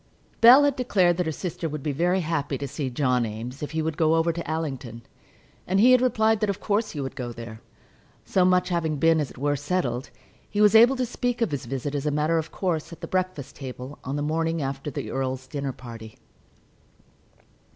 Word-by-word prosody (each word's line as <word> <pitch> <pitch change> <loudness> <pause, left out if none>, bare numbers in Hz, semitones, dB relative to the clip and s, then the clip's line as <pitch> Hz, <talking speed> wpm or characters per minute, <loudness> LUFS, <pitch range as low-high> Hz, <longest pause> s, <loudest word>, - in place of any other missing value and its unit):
Bell 250 +5 +9
had 285 -2 +2
declared 185 -9 +2
that 180 -2 0
her - - 0
sister 165 0 -4
would 150 -2 -6
be 150 - -1
very 175 +6 +1
happy 155 -4 -2
to 140 - -4
see 140 0 -4
John 125 -1 +1
Eames 115 +4 -6
if 150 - -3
he 160 0 -2
would 160 -1 -3
go 160 0 +3
over 165 +1 +2
to 170 0 -6
Allington, 135 -7 -4 0.6
and 190 +2 +2
he 245 +5 +7
had 255 -1 +6
replied 220 -3 +2
that 215 -1 0
of 200 - -2
course 215 +1 0
he 150 - -6
would 135 -1 -4
go 120 -2 -5
there. 115 -1 -9 0.6
So 185 - +2
much 180 0 +3
having 160 -4 -1
been, 165 +2 +4
as 145 -4 -1
it - - -15
were, 145 +2 0
settled, 140 -4 -2 0.4
he 205 - -3
was 210 0 +6
able 235 +4 +7
to 255 -1 0
speak 245 0 -2
of 230 -8 0
his 140 -3 -4
visit 135 +2 -3
as 145 0 -2
a - - +3
matter 150 +3 +1
of 160 +1 -6
course 170 -3 -2
at 170 - -11
the - - -5
breakfast 185 -7 -2
table, 130 0 -8
on 135 +2 -4
the 145 - -2
morning 165 +2 0
after 135 0 -3
the 140 - -5
earl's 130 -1 -3
dinner 140 0 -4
party. 115 -3 -11
155 Hz, 220 wpm, -25 LUFS, 135-185 Hz, 0.6 s, Bell